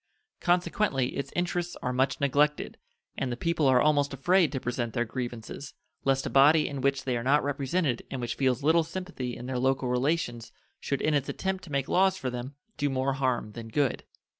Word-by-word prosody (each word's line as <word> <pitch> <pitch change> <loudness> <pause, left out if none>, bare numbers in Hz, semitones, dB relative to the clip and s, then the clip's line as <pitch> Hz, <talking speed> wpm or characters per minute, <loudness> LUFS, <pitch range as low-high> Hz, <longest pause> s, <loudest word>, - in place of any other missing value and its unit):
Consequently 175 -6 +1
its 140 -1 -4
interests 175 0 -1
are 125 - -1
much 130 +2 +1
neglected, 145 +2 +1 0.4
and 130 -2 -2
the 120 - -3
people 165 0 +1
are 130 -1 +5
almost 145 -1 +2
afraid 175 +3 +3
to 135 - -2
present 120 -2 -3
their 120 -1 +1
grievances, 120 +3 -6 0.3
lest 135 0 +2
a - - -1
body 150 +3 +6
in 140 -2 -4
which 140 +1 +1
they 130 -2 -1
are 115 - -3
not 140 +4 +3
represented 140 -1 0
and 135 - -4
which 120 -1 -2
feels 130 0 0
little 160 +2 +4
sympathy 165 -7 -5
in 120 - -8
their 130 -1 -2
local 130 0 +1
relations 125 -2 -1 0.3
should 140 - -2
in 155 - +2
its 145 -2 0
attempt 190 -1 -2
to 160 - -12
make 140 -1 0
laws 190 +1 +3
for 130 -9 -3
them 125 +3 -6 0.2
do 145 - 0
more 135 0 0
harm 130 -5 -1
than 115 +1 -8
good. 135 +3 0
135 Hz, 200 wpm, -28 LUFS, 125-155 Hz, 0.4 s, body